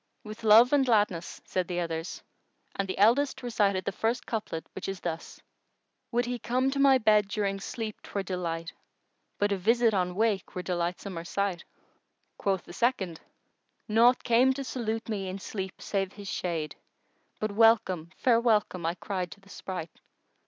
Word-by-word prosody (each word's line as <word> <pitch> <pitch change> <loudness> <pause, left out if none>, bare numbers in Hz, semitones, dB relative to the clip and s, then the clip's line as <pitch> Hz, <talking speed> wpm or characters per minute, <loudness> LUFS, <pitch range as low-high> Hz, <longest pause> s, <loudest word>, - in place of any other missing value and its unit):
"With 215 +1 -9
love 225 +5 +7
and 285 -2 +5
gladness," 205 -8 +1
said 185 -2 -1
the 175 -1 -2
others; 165 0 -4 0.5
and 195 - -1
the 185 - -4
eldest 250 +7 +3
recited 205 -6 +1
the - - 0
first 225 +5 -1
couplet 210 -8 -4
which 190 - -5
is 195 -2 -5
this:— 165 -1 -5 0.7
Would 240 0 +1
he 245 0 -3
come 255 +3 +1
to 275 - -2
my 275 -1 +6
bed 215 -4 +4
during 200 -1 -1
sleep 215 +1 -5
'twere 200 - -4
delight 170 -2 -3 0.3
* - - -47
But 205 0 +1
a 200 - +1
visit 230 +4 +3
on 180 -2 0
wake 215 -2 0
were 180 - -3
delightsomer 175 0 -3
sight! 200 -3 -2 0.7
Quoth 195 -2 0
the - - -12
second:— 190 -7 0 0.7
Naught 235 +3 +4
came 250 +3 +4
to 275 +1 -4
salute 225 -3 -3
me 200 -4 -3
in 185 - -4
sleep 190 -1 -6
save 195 -1 -2
his 205 -1 -10
shade 160 -6 -3 0.3
* - - -42
But 215 -1 -1
"welcome, 210 -6 +3
fair 235 -3 +4
welcome," 210 -6 +1
I 170 - -1
cried 185 -2 -3
to - - -21
the 195 0 -21
spright! 180 -5 -6
200 Hz, 175 wpm, -28 LUFS, 180-230 Hz, 0.7 s, love